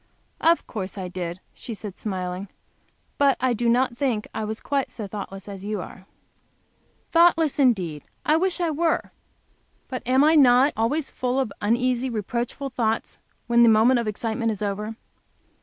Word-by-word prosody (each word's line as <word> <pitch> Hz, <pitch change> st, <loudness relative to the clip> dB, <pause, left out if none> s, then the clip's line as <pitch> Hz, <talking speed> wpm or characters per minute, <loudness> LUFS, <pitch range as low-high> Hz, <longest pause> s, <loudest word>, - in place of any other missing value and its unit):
"Of 335 Hz, +1 st, +3 dB
course 200 Hz, -3 st, -6 dB
I 185 Hz, -2 st, -4 dB
did," 180 Hz, 0 st, -5 dB
she 230 Hz, -, -7 dB
said, 205 Hz, -2 st, -7 dB
smiling. 185 Hz, -1 st, -4 dB, 0.7 s
"But 280 Hz, -1 st, +4 dB
I 255 Hz, -1 st, +2 dB
do 235 Hz, +1 st, 0 dB
not 245 Hz, +1 st, +2 dB
think 245 Hz, -7 st, 0 dB
I 220 Hz, -, -3 dB
was 220 Hz, +1 st, -3 dB
quite 275 Hz, -1 st, -1 dB
so 220 Hz, -, -6 dB
thoughtless 195 Hz, -1 st, -7 dB
as 195 Hz, -2 st, -8 dB
you 210 Hz, 0 st, -3 dB
are." 185 Hz, +2 st, -10 dB, 1.0 s
"Thoughtless" 330 Hz, -3 st, +4 dB
indeed! 185 Hz, -, +2 dB, 0.2 s
I 305 Hz, -, +4 dB
wish 365 Hz, +2 st, +1 dB
I 340 Hz, -2 st, +1 dB
were! 325 Hz, +2 st, 0 dB, 0.8 s
But 255 Hz, -, -4 dB
am 260 Hz, +2 st, +4 dB
I 310 Hz, +2 st, +5 dB
not 265 Hz, -1 st, +6 dB
always 270 Hz, +7 st, 0 dB
full 255 Hz, +1 st, -1 dB
of 255 Hz, -6 st, -1 dB
uneasy, 245 Hz, +4 st, +1 dB
reproachful 240 Hz, +5 st, -3 dB
thoughts 225 Hz, -3 st, -1 dB, 0.3 s
when 235 Hz, 0 st, +4 dB
the 235 Hz, -, +7 dB
moment 225 Hz, +3 st, +5 dB
of 235 Hz, -, -3 dB
excitement 225 Hz, +2 st, -1 dB
is 210 Hz, -1 st, -4 dB
over? 210 Hz, +2 st, -3 dB
235 Hz, 165 wpm, -24 LUFS, 205-265 Hz, 1.0 s, the